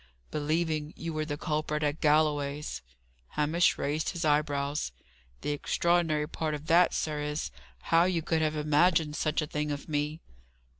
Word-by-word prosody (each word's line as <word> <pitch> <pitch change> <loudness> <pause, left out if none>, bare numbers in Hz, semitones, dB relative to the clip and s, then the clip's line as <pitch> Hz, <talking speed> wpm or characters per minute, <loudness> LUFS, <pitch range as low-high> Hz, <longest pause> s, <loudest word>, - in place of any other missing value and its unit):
"Believing 155 0 -1
you 165 0 -4
were 155 0 -1
the 145 -2 -3
culprit 150 -1 -1
at 150 +1 -1
Galloway's." 150 - +1 0.6
Hamish 155 +4 +3
raised 150 +2 -1
his 170 -3 -3
eyebrows. 145 - +1 0.5
"The 150 - -1
extraordinary 160 0 +1
part 155 -1 -2
of 150 +1 -8
that, 170 +2 +4
sir, 150 -1 -1
is, 150 - -3 0.4
how 165 +1 +6
you 175 -3 0
could 160 0 +1
have 155 0 +1
imagined 150 +1 +3
such 155 -1 0
a - - -2
thing 150 0 -2
of 145 -1 -5
me." 150 +1 -1
150 Hz, 155 wpm, -29 LUFS, 150-160 Hz, 0.6 s, how